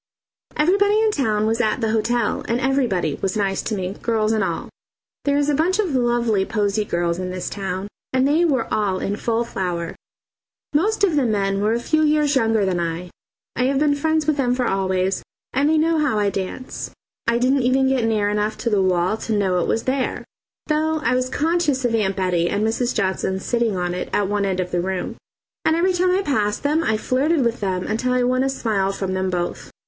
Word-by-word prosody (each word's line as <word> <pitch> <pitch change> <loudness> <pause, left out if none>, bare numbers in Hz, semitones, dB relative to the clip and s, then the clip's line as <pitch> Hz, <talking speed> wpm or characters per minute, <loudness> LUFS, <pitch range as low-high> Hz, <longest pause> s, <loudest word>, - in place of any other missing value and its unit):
Everybody 405 +6 +3
in 440 -1 +3
town 215 - 0
was 225 +2 +1
at 215 0 0
the 225 -2 0
hotel, 225 0 0
and 235 +1 0
everybody 245 - +1
was 195 +1 -1
nice 195 -2 0
to 220 - -3
me, 185 -1 -3
girls 220 -2 +1
and 220 -2 +1
all. - - -3 0.6
There 285 0 +2
is 290 0 +1
a 295 - +2
bunch 330 +6 +2
of 390 -8 0
lovely 240 -5 +2
posy 210 0 0
girls 170 -2 -1
in 185 0 -3
this 185 0 -4
town, 195 -1 -4 0.2
and 260 +1 +2
they 310 +4 +3
were 275 -8 +2
all 205 -3 +1
in 200 +2 -2
full 230 +2 0
flower. 180 -7 -3 0.8
Most 410 +8 +1
of 360 -6 +3
the 285 - +3
men 195 -2 0
were 215 +2 +2
a 235 - 0
few 310 +6 +1
years 300 -1 +2
younger 225 -4 +2
than 185 -2 0
I. 170 +1 -3 0.4
I 250 - +1
have 270 +1 +1
been 295 +1 +3
friends 315 +2 0
with 305 -1 +1
them 250 -3 +1
for 250 -1 0
always, 190 0 0 0.3
and 280 +3 +2
they 315 - +3
know 320 +1 +2
how 295 -7 +1
I 205 -1 +1
dance. 195 +7 -5 0.4
I 235 0 +3
didn't 260 +3 +2
even 260 +2 +2
get 265 -2 +1
near 215 -2 +1
enough 210 +1 -1
to 235 - -2
the 205 -2 +3
wall 185 +2 +1
to 220 -1 -2
know 190 -3 +1
it - - 0
was 225 - 0
there, 260 0 -1 0.4
though 315 +1 0
I 250 - +2
was 255 0 0
conscious 305 -3 0
of 235 - +1
Aunt 200 -4 +1
Bettie 180 -3 +1
and 205 +2 0
Mrs. 235 +2 0
Johnson 190 -2 -1
sitting 235 -1 0
on 180 0 -1
it 180 - -4
at 205 - +1
one 205 0 0
end 190 -1 -1
of 180 0 -2
the 175 - 0
room, 185 0 -3 0.5
and 320 - +3
every 365 +3 +2
time 365 +1 +2
I 375 +2 +2
passed 210 - 0
them 305 +3 +1
I 220 -6 +1
flirted 270 +5 +1
with 235 0 0
them 185 -2 -2
until 250 +4 -1
I 250 0 +2
won 255 +1 +2
a 270 - +1
smile 215 -7 0
from 195 -1 -3
them 185 0 -1
both. 175 -1 -3
225 Hz, 220 wpm, -21 LUFS, 195-275 Hz, 0.8 s, Everybody